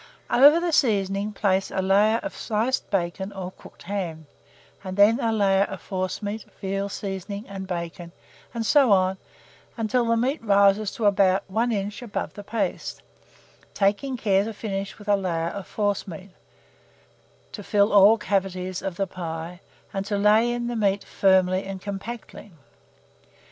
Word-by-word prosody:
Over 290 +6 +7
the 340 -1 -1
seasoning 200 -5 +1
place 195 -2 0
a - - -3
layer 200 +4 +3
of 300 - -5
sliced 230 +4 -1
bacon 190 +1 -2
or 185 -2 -6
cooked - - -16
ham, 170 -5 -4 0.6
and 185 0 -6
then 215 +4 +5
a 230 -4 0
layer 200 -2 +3
of 195 -2 -7
forcemeat, 200 +3 -4
veal 195 +1 -2
seasoning, 200 +1 -5
and 195 -1 -7
bacon, 170 -1 -5 0.4
and 230 -1 -3
so 275 -2 +5
on 190 -1 +3 0.6
until 230 +2 +1
the 230 0 +2
meat 260 +4 -1
rises 200 0 +3
to 225 - -3
about 195 -2 +3
an 225 +5 0
inch 205 +1 -3
above 235 -4 -4
the 205 - -9
paste; 225 +2 -3 0.7
taking 210 +7 0
care 200 -3 +2
to 225 +1 -5
finish 195 -2 -4
with 210 - -14
a 205 - +4
layer 170 -4 -1
of 200 +1 -7
forcemeat, 200 -3 -3 1.2
to 210 - -7
fill 205 +1 +2
all 205 +2 +7
the 210 - -12
cavities 185 -2 -1
of 190 -3 -4
the 195 - -1
pie, 170 -1 -6 0.3
and 195 -1 -2
to 205 -1 -1
lay 215 +4 +4
in 240 0 -2
the 240 0 -3
meat 200 -2 +1
firmly 190 -1 +2
and 195 0 -6
compactly. 205 +2 -7
200 Hz, 160 wpm, -24 LUFS, 190-215 Hz, 1.2 s, Over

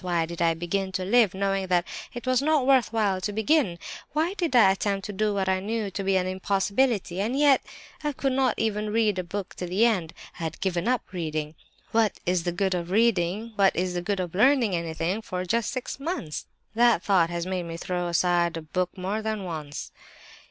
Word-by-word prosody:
Why 175 -3 0
did 170 +1 -7
I 165 -1 +3
begin 190 +3 -2
to 185 -1 -2
live, 210 -2 +4
knowing 195 0 0
that 180 -1 +2 0.3
it 240 - -8
was 255 0 +2
not 300 -2 +2
worthwhile 225 -7 +2
to 205 - -2
begin? 220 - +2 0.4
Why 320 +5 +1
did 340 -9 -1
I 205 -6 +7
attempt 195 0 -1
to 210 - -5
do 210 +2 +1
what 195 -2 -1
I 190 0 +2
knew 210 +1 -3
to 195 +1 -4
be 195 0 +1
an 185 -1 +2
impossibility? 195 +1 0
And 235 +6 -1
yet 285 -2 +5 0.4
I 295 - 0
could 270 -1 -1
not 260 -3 +2
even 215 -1 -1
read 215 -3 +2
a - - -1
book 195 +2 -5
to 180 - -4
the 190 +6 +3
end; 185 -9 0 0.3
I 165 - -3
had 160 -1 -5
given 185 0 -1
up 250 -1 +1
reading. 155 -3 -3 0.4
What 220 -2 +2
is 180 -1 0
the 175 - +1
good 190 +2 0
of 175 -1 -3
reading, 210 0 +1
what 195 -1 +4
is 180 +1 -1
the 175 - -2
good 195 +2 -2
of 180 -2 -3
learning 235 -1 +4
anything, 170 +4 -2
for 185 -4 -4
just 230 +4 0
six 260 0 -5
months? 275 - -4 0.3
That 235 -4 +4
thought 180 -5 +3
has 170 0 -3
made 185 -2 -3
me 165 0 -5
throw 180 0 -2
aside 175 0 +2
a 165 - -6
book 180 +4 -2
more 195 +4 -2
than 215 -2 -3
once. 155 -5 -6
195 Hz, 215 wpm, -26 LUFS, 175-225 Hz, 0.4 s, I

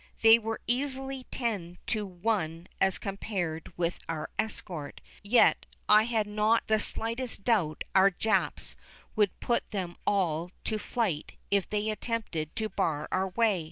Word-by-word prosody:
They 225 +1 +9
were 225 0 -3
easily 265 +1 -1
ten 200 -8 -3
to 215 -3 -1
one 175 -3 -2
as 190 -1 +3
compared 190 -5 -4
with 175 0 -1
our 160 -2 -3
escort, 180 -8 -3 0.2
yet 225 +4 +4 0.2
I 215 +1 +7
had 225 -3 +1
not 215 +2 +2
the 220 0 +3
slightest 230 +1 0
doubt 185 -10 +1
our 195 +1 +7
Japs 215 +4 0 0.4
would 210 -3 +2
put 240 - 0
them 180 -4 -3
all 175 -4 +1
to 215 -1 -1
flight 205 -10 -2 0.2
if 200 -2 +2
they 210 +1 0
attempted 210 -8 -3
to 220 - -1
bar 155 -8 -1
our 190 +1 +1
way. 215 -1 +2
205 Hz, 145 wpm, -29 LUFS, 175-225 Hz, 0.4 s, They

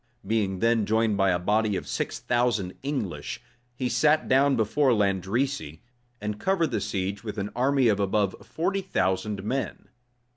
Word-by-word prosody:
Being 100 -4 0
then 115 -2 +2
joined 110 -1 +2
by 95 -1 +3
a 90 - +2
body 105 +3 +1
of - - -4
six - - -2
thousand 120 -6 0
English, 130 - -3 0.4
he 125 0 -1
sat 150 +6 +3
down 135 +1 +4
before 125 +4 +2
Landrecy, 100 - -1 0.4
and 105 0 -4
covered 170 - +1
the - - -1
siege 100 -1 -3
with 105 -1 -6
an 100 +1 -3
army 130 +1 +3
of 105 -2 +2
above 100 0 +1
forty 190 +4 -2
thousand 95 - -1
men. 130 +6 -3
110 Hz, 155 wpm, -26 LUFS, 100-130 Hz, 0.4 s, down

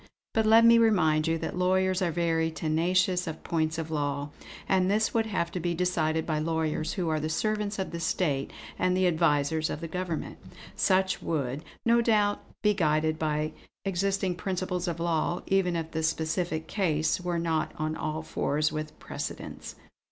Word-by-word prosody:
But 220 -1 +2
let 225 +1 +7
me 230 0 +7
remind 160 -9 +3
you 165 0 +1
that 160 - -4
lawyers 185 +1 +2
are 180 - +2
very 165 -1 +1
tenacious 175 +3 +1
of 160 - -6
points 160 -1 0
of 160 -1 -4
law, 145 -1 -2 0.4
and 185 -1 +3
this 215 +2 +2
would 225 -1 +1
have 170 -5 -1
to 180 - -3
be 170 0 -1
decided 160 -3 0
by 155 -2 -1
lawyers 160 0 -1
who 180 -3 -2
are 155 -1 +1
the 155 +1 -2
servants 210 +4 -1
of 190 - -3
the 170 - -4
state 145 -5 0 0.3
and 185 0 +2
the 185 - +3
advisers 160 -2 +2
of - - -3
the 165 - -5
governments. 180 -1 -4 0.3
Such 190 0 +2
would, 140 -2 -2 0.2
no 235 0 +5
doubt, 210 -3 +2 0.2
be 210 0 +4
guided 155 -3 +1
by 155 0 0 0.3
existing 195 0 0
principles 180 -1 -2
of 170 -1 -3
law, 170 +1 0
even 190 -2 +2
if 165 -1 -3
the 160 - -2
specific 160 0 -1
case 160 -4 0
were 175 -1 -1
not 165 -1 0
on 155 0 -2
all 155 0 -3
fours 150 -1 0
with 155 0 -5
precedents. - - -6
170 Hz, 175 wpm, -28 LUFS, 155-185 Hz, 0.4 s, let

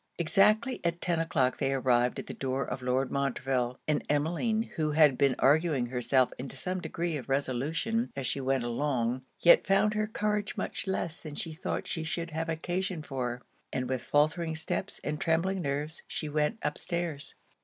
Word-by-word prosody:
Exactly 210 +8 +3
at 170 0 0
ten 170 -2 0
o'clock 135 -6 +1
they 135 - +1
arrived 125 -2 +2
at - - -5
the - - -6
door 135 0 -2
of 130 - -5
Lord 125 +1 0
Montreville; 130 -2 0
and 150 - +1
Emmeline, 175 +10 +1
who 155 -2 0
had 150 -3 +6
been 135 0 +3
arguing 150 -2 +3
herself 125 +1 +2
into 130 +2 -5
some 185 0 -2
degree 170 -2 -2
of 135 - -8
resolution 145 - 0
as 135 -1 -3
she 135 - 0
went 135 -1 +1
along, 120 0 0 0.2
yet 170 - +7
found 195 +2 +4
her 215 0 0
courage 210 -1 -1
much - - -3
less 170 -3 -2
than 150 -3 -7
she 160 - -3
thought 160 - -3
she 160 - -3
should 165 +1 -3
have 165 +1 -2
occasion 175 +1 -2
for; 125 -3 -3 0.3
and 130 -1 -2
with 130 -1 -1
faultering 160 +2 +1
steps 160 +4 -3
and 150 0 -3
trembling 180 +4 +1
nerves 145 +2 -2
she 155 - -3
went 150 +8 0
up - - -1
stairs. 170 -5 -3
150 Hz, 180 wpm, -30 LUFS, 135-170 Hz, 0.3 s, yet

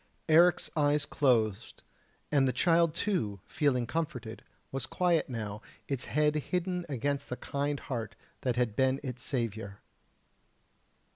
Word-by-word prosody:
Eric's 170 +2 +5
eyes 145 -1 +3
closed, 115 -8 +1 0.5
and 140 -3 +4
the - - +2
child 170 +1 +3
too, 165 - -1
feeling 135 -6 +1
comforted, 130 -8 -4 0.3
was 135 - -3
quiet 175 -4 +1
now, 110 -3 -4 0.3
its 135 -3 -2
head 150 0 +2
hidden 180 +3 -2
against 140 +1 -2
the 125 - -3
kind 145 0 -2
heart 115 -6 -4 0.3
that 125 -2 0
had 120 -4 0
been 130 +2 +2
its 125 -3 -5
saviour. 110 -7 -3
140 Hz, 130 wpm, -31 LUFS, 120-155 Hz, 0.5 s, Eric's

